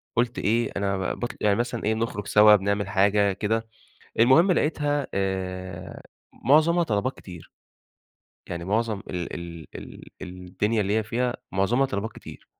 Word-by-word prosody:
قُلت 120 +1 0
إيه 115 +3 +1
أنا 100 -2 -1
ب - - -10
باط 120 - -2
يعني 100 -1 +3
مثلًا 120 0 -2
إيه 110 +2 +1
بنخرج 110 -2 -3
سوا 105 0 +7
بنعمل 100 0 0
حاجة 100 0 +3
كده، 110 +3 -1 0.5
المهم 135 - +6
لقيتها 145 -4 0
آآ، 95 -2 -4 0.4
معظمها 160 +6 +5
طلبات 120 -1 -1
كتير. 90 -4 -12 1.0
يعني 85 0 -5
معظم 110 +2 0
ال 90 -2 -4
ال 85 -2 -8
ال - - -10 0.2
الدنيا 90 +4 -2
اللي 100 +1 0
هي 110 - +2
فيها 120 +3 -1 0.2
معظمها 120 +8 +2
طلبات 105 0 -4
كتير. - - -12
105 Hz, 150 wpm, -25 LUFS, 95-120 Hz, 1.0 s, سوا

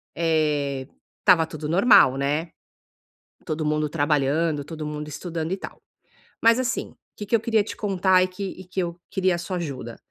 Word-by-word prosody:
eh, 150 -5 0 0.3
estava 180 -4 +5
tudo 155 -1 -6
normal, 175 - +6
né? 150 +4 -1 1.0
Todo 155 0 -2
mundo 150 0 0
trabalhando, 150 0 +1
todo 155 +1 -7
mundo 150 0 -5
estudando 160 +2 -4
e 190 - -1
tal, - - -9 0.6
mas, 230 +2 +5
assim, 245 -2 -2
o - - -23 0.2
que 210 - -5
que 230 - +2
eu 230 - +3
queria 225 -2 +2
te 215 - -7
contar 190 -2 +2
e 185 - +1
que 185 +2 -7
e 190 -1 -6
que 185 +1 -5
eu 170 -1 -3
queria 185 -1 +1
a - - -3
sua 180 +2 -4
ajuda, 135 -8 -6
165 Hz, 185 wpm, -24 LUFS, 150-185 Hz, 1.0 s, normal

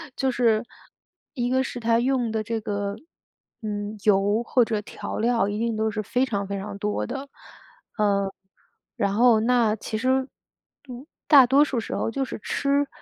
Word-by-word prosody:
就 265 -1 0
是 235 -2 +2 0.7
一 245 -2 -1
个 260 +1 +2
是 250 - -5
它 230 0 +2
用 250 -2 0
的 220 - -1
这 225 +1 -3
个， 200 -1 -3 0.7
嗯， 210 -1 -4
油 205 +1 +3
或 245 0 +3
者 215 -2 -2
调 - - -7
料 230 -1 +2
一 205 +1 -3
定 230 -1 -1
都 220 0 0
是 215 0 -3
非 250 +5 0
常 200 -6 -3
非 200 0 -3
常 195 +1 -6
多 210 +1 -1
的。 275 +3 -6 0.7
呃， 200 -2 +1 0.6
然 200 -1 0
后 230 +1 +5
那 230 -2 +2
其 220 +1 -6
实， 260 +4 +1 0.6
嗯， 250 +3 -8 0.2
大 275 -4 +8
多 270 +4 +5
数 270 -5 -1
时 225 - -5
候 - - -1
就 270 +4 -2
是 - - -7
吃 280 +4 0
230 Hz, 190 characters per minute, -24 LUFS, 210-250 Hz, 0.7 s, 大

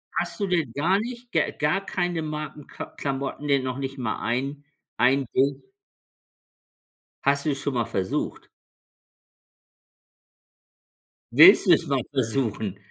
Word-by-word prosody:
Hast - - -2
du 200 - 0
denn 165 -9 0
gar 180 +7 +2
nicht 240 +1 -7
g 160 - +3 0.2
gar 180 +7 0
keine 175 -2 -1
Marken 150 -1 -6
K - - -7
Klamotten, 140 +1 -3
die 140 -1 +3
noch 130 0 -3
nicht 135 0 -5
mal 120 -4 -2
ein 135 +5 -2 0.3
ein 130 +4 +3
Ding? 135 +2 +1 1.6
Hast 140 +1 +2
du 155 - +2
es 140 - -2
schon 140 -2 -2
mal 115 -2 +1
versucht? 95 -5 -3 2.9
Willst 175 +10 +9
du 185 - +5
es 165 - +1
mal 140 -2 +1
versuchen? 115 -6 -1
140 Hz, 135 wpm, -25 LUFS, 130-160 Hz, 2.9 s, Willst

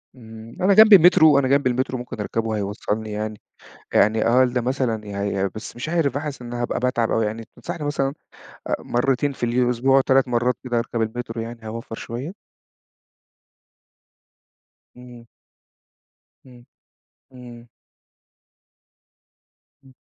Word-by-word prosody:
امم، 110 -1 -12
أنا 195 +2 +4
جنبي 215 0 +9
المترو، 160 -5 +6
أنا 130 - 0
جنبي 140 -1 +2
المترو 130 +1 -1
ممكن 120 -2 -8
أركبه 110 +1 -2
هيوصلني 105 +2 -3
يعني 105 0 -5 0.5
يعني 110 +1 +3
أقل 125 0 +3
مثلًا 120 -4 -2
يعني 100 -1 -2
بس 110 - -8
مش 125 +6 -5
عارف 160 -5 0
حاسس 145 -2 -5
إن 120 0 -8
هابقى 120 0 -2
باتعب 125 -2 0
أوي 110 -1 +1
يعني 110 +1 -5
تنصحني 170 -3 -6
مثلًا 140 -2 -1 0.6
آآ - - +1
مرتين 135 +3 0
في 125 - -3
اليو 120 +2 +1
الأسبوع، 125 +2 +2
و3 135 0 +2
مرّات 125 +1 +1
كده 120 -2 -1
أركب 115 0 -2
المترو 115 0 -4
يعني 115 +1 -8
هاوفّر 115 +1 -7
شوية؟ 130 - -6 2.6
امم. 120 -1 -14 1.2
امم، 125 -2 -17 0.7
امم. 120 -2 -12 2.2
امم. 135 -1 -19
120 Hz, 130 wpm, -22 LUFS, 115-135 Hz, 2.6 s, جنبي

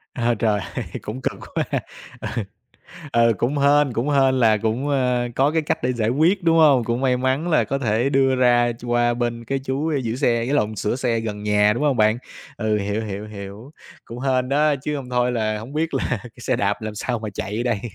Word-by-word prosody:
À 120 -2 +1
trời 105 -3 +2 0.2
ơi - - -3 0.2
cũng 120 +5 -6
cực - - -3 0.2
quá - - +2
ha, - - +1 0.4
ừ, 115 -3 -3 0.7
ừ, 115 -1 +4
cũng 135 +8 0
hên 140 -2 +3
cũng 120 +6 -1
hên 135 -2 +3
là 110 -2 +4
cũng, 115 +6 -1
ờ, 125 -3 +1
có 140 +3 +3
cái 160 0 +1
cách 150 - -2
để 125 0 +1
giải 110 -2 0
quyết, 170 +8 +2
đúng 165 0 +4
hông, 140 -6 +5
cũng 120 +3 -2
may 125 -2 +2
mắn 130 +7 0
là 155 -8 +3
có 135 +6 -2
thể 120 +1 +1
đưa 135 -1 +3
ra 120 -1 +3
ch 120 - -11
qua 120 0 +2
bên 120 -1 -3
cái 135 +2 -1
chú 140 +4 -2
giữ 115 +1 -2
xe, 120 -4 +1
ý 120 - -3
lộn, 110 -7 +1
sửa 105 +4 -1
xe 120 -3 0
gần 105 -2 -5
nhà, 105 0 +3
đúng 150 - -2
hông 140 -5 +2
bạn? 110 +2 +3 0.4
Ừ, 110 -2 0
hiểu, 105 +2 -2
hiểu, 105 +1 -5
hiểu, 105 +5 -9 0.3
cũng 120 +1 -8
hên 130 -1 0
đó 150 +1 +3
chứ 145 +3 -4
hông 130 -3 -6
thôi 125 0 +1
là 110 -2 -1
hổng 120 +6 -9
biết 160 0 -1
là 135 - 0 0.2
cái 120 - -10
xe - - 0
đạp 100 +2 -1
làm 110 -1 -5
sao 120 +2 -2
mà 110 -1 -5
chạy 105 +6 -3
đây. 115 -5 0
120 Hz, 235 wpm, -22 LUFS, 110-135 Hz, 0.7 s, hông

